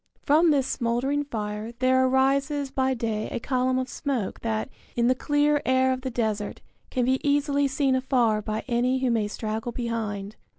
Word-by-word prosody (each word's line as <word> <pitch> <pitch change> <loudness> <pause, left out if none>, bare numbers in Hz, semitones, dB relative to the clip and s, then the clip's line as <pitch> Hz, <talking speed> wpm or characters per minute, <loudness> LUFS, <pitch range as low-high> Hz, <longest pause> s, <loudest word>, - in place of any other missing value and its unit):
From 315 +4 +4
this 280 -4 +3
smouldering 260 +4 0
fire 215 -2 -4
there 260 +2 +3
arises 275 +2 +1
by 265 0 +1
day 220 -2 -2
a - - -3
column 255 +1 0
of 255 0 -1
smoke 260 -8 -3
that, 220 -1 -2 0.3
in 235 - +2
the 255 - +5
clear 290 +2 +1
air 260 0 +3
of 255 - -5
the 260 - -3
desert, 220 -4 -2 0.3
can 250 -2 0
be 260 +1 +1
easily 285 0 +2
seen 270 0 +1
afar 250 -5 +2
by 215 +1 -3
any 250 +1 +1
who 260 -2 +1
may 220 -3 +1
straggle 220 +2 -4
behind. 220 -4 -4
255 Hz, 175 wpm, -26 LUFS, 225-270 Hz, 0.3 s, the